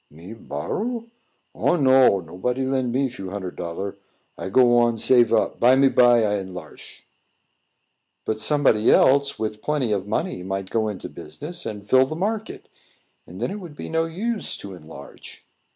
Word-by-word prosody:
"Me 85 +8 -12
borrow? 215 - -4 0.5
Oh, - - +1
no; 130 - +4
nobody 125 +11 -3
lend 130 -2 -1
me 135 +2 +1
few 105 -7 -8
hunnard 95 -2 -6
dollar. 95 +4 -5 0.4
I - - -6
go 120 +3 +5
on, 120 -1 +2
save 120 0 +4
up; 115 - +1
bimeby 125 -2 +5
I 105 -1 0
enlarsh." 90 -5 -11 1.2
"But 110 0 -2
somebody 140 -8 +3
else, 140 +1 +4
with 110 -1 -4
plenty 145 -7 -1
of 100 -1 -1
money, 105 -3 -2
might 95 +1 -5
go 110 -1 0
into 105 -3 -5
the - - -17
business 155 - -7
and 105 -1 -7
fill 130 +4 +4
the 155 - -5
market; 215 +5 -4 0.6
then - - -4
it 205 - -5
would 170 -6 -10
be - - -7
no 165 0 0
use 210 +7 -3
to 100 - -9
enlarge." 80 -3 -13
120 Hz, 160 wpm, -23 LUFS, 100-140 Hz, 1.2 s, go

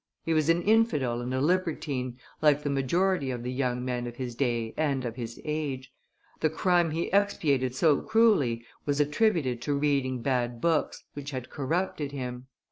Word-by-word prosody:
He 165 - 0
was 155 0 +2
an 170 +1 +3
infidel 150 - +2
and 125 +1 -4
a 130 - 0
libertine, 145 -6 -1 0.2
like 150 -1 +4
the 145 - -1
majority 140 +3 +1
of 120 -2 -4
the 125 - -3
young 125 -1 -1
men 125 -1 -2
of 120 - -7
his 125 -1 -4
day 120 -3 -1
and 140 -4 0
of 115 -1 -4
his 120 -2 -6
age; 145 -4 -3 0.5
the 155 - +2
crime 175 +1 +2
he 165 +4 -3
expiated 145 -11 +2
so 150 0 +3
cruelly 145 - +3 0.2
was 145 0 -1
attributed 150 - +1
to 145 +2 0
reading 135 -4 0
bad 120 -3 0
books, 165 +3 0
which 145 -1 -6
had 130 -3 -6
corrupted 150 0 -2
him. 125 -2 -5
140 Hz, 175 wpm, -28 LUFS, 125-160 Hz, 0.5 s, like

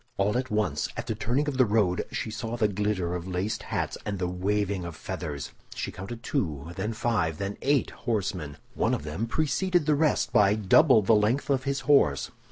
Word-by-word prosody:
All 100 +3 +1
at 130 +1 -1
once, 105 -9 0
at - - -3
the - - -1
turning 130 +7 0
of 135 -3 -2
the 130 - +7
road 100 -4 +2
she 110 - -3
saw 115 +1 -4
the 110 -3 +3
glitter 100 -3 -1
of 90 0 -4
laced 95 +3 -2
hats - - -3
and 100 -1 -3
the 90 -1 -1
waving 100 +1 -1
of 85 -2 -6
feathers; 75 -2 -5 0.2
she - - -3
counted 115 +5 -8
two, 80 - -2
then 105 +4 -2
five, 105 -9 0
then 100 +2 -3
eight 140 -1 +2
horsemen. 90 - -3 0.2
One - - +1
of - - -6
them 80 +10 -3
preceded 160 +5 +1
the 155 - +3
rest 150 0 +1
by 100 0 +5
double 110 - +5
the 105 - +4
length 110 +7 +2
of 130 -1 +1
his 140 0 -1
horse. 105 - +3
105 Hz, 200 wpm, -27 LUFS, 90-125 Hz, 0.2 s, the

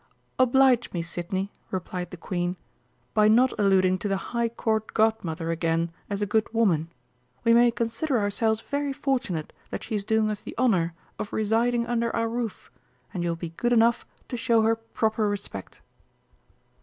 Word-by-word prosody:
"Oblige 255 -1 +4
me, 170 -2 -1
Sidney," 185 +3 -3 0.2
replied 180 -1 -4
the 180 - -9
Queen, 175 +1 -2 0.6
"by 210 -1 +5
not 245 +4 +5
alluding 185 -2 +3
to 205 - -2
the 195 -1 +1 0.2
High 235 -1 +1
Court 220 -1 -2
Godmother 175 -7 +1
again 165 0 0 0.2
as 200 0 -1
a - - +2
good 215 +2 0
woman; 175 -8 +2 0.5
we 230 - +5
may 240 +1 +6
consider 235 +4 -1
ourselves 220 +1 +1
very 285 +1 -2
fortunate 245 - -2 0.2
that - - -5
she - - -6
is 205 -2 0
doing 220 +1 +2
us 210 0 -5
the - - -9
honour 185 -9 +2 0.2
of 205 - -4
residing 230 +2 +1
under 235 -1 0
our 230 0 +1
roof, 230 -2 -4 0.4
and 180 - -3
you 175 - 0
will 170 - 0
be 165 0 -6
good 240 +9 0
enough 235 0 +4 0.3
to 245 - -3
show 230 -1 +3
her 225 +1 +3
proper 220 -1 -1
respect." 200 - -6
220 Hz, 170 wpm, -26 LUFS, 185-235 Hz, 0.6 s, may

